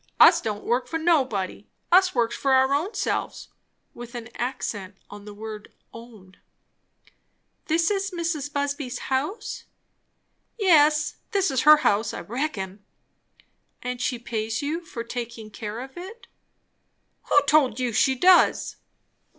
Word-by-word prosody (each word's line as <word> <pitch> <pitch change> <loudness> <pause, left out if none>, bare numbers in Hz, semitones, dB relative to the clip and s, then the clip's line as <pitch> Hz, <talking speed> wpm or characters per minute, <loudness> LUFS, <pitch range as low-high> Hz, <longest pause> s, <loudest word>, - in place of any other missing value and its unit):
"Us - - +8
don't 210 -2 -4
work 245 +2 0
for 325 - -2
nobody. 260 - 0 0.2
Us 370 -1 +5
works 235 -1 +1
for 270 -1 +1
our 265 +1 +4
ownselves;" 330 +10 -2 0.4
with 240 0 -10
an 235 -1 -7
accent 205 -6 -4
on 205 0 -10
the 210 - -9
word 215 -1 -8 0.2
"own." 220 -5 -14 1.3
"This 330 +3 +2
is 390 -1 -1
Mrs. 335 -5 -3
Busby's 285 -2 -3 0.2
house?" 295 - -3 0.9
"Yes, 305 -6 +4 0.2
this 390 -5 +2
is 260 -1 +1
her 305 - +10
house, 210 0 +1
I - - -5
reckon." 210 -6 -4 1.0
"And 250 0 -4
she 250 - -1
pays 225 +1 -3
you 320 +4 -3
for 235 -8 -7
taking 235 -2 -7
care 210 +1 -6
of 265 +1 -10
it." 390 +7 -10 1.0
"Who - - +6
told 280 -5 +3
you 250 -2 -1
she 265 +4 +3
does?" 360 +6 +4
260 Hz, 135 wpm, -24 LUFS, 225-310 Hz, 1.3 s, her